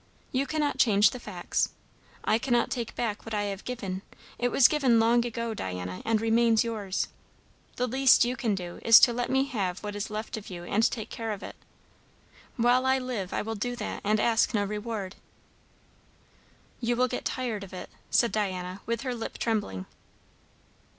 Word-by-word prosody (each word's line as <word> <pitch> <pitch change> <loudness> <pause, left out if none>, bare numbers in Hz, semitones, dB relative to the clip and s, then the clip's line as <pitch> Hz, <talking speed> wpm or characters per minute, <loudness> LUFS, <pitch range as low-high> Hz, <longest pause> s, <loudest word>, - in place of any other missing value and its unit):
You 270 +2 0
cannot 295 0 -1
change 205 -3 +5
the 250 - -7
facts. - - -1 0.5
I 220 - +2
cannot 240 -2 +1
take 235 -3 -3
back 220 -3 -2
what 225 -1 -4
I 205 - 0
have 200 -1 -4
given; 195 -7 -4 0.4
it 245 - +2
was 250 +1 +6
given 265 -7 +3
long 235 +1 +4
ago, 235 -1 -3
Diana, 90 - -5
and 225 -1 +2
remains 225 0 +3
yours. 210 -5 -2 0.7
The 250 - 0
least 260 0 +5
you 245 +1 -1
can 230 -6 0
do, 175 -2 -6
is 230 0 +9
to 240 - +6
let 245 +1 -2
me 265 +1 +3
have 200 -9 -3
what 205 0 -4
is 205 0 -3
left 215 +1 -4
of 215 - -9
you 175 -2 -7
and 215 +5 +2
take 220 -3 -6
care 225 -1 -3
of 205 -2 -5
it. - - -8 1.0
While 245 +2 +3
I 265 0 +4
live 245 -8 -4
I - - -1
will 225 +1 -3
do 245 +3 -3
that, 220 -3 -5
and 215 +1 +2
ask 230 +1 +2
no 205 - +2
reward." 210 -1 -4 1.6
"You 240 0 0
will 250 +1 +3
get 250 - -4
tired 235 -6 -2
of 195 - -10
it," 180 -1 -8 0.2
said 235 - +3
Diana, 185 -2 -2
with 230 0 -1
her 255 -2 -2
lip 230 -2 -5
trembling. 205 - -1
225 Hz, 185 wpm, -28 LUFS, 205-245 Hz, 1.6 s, is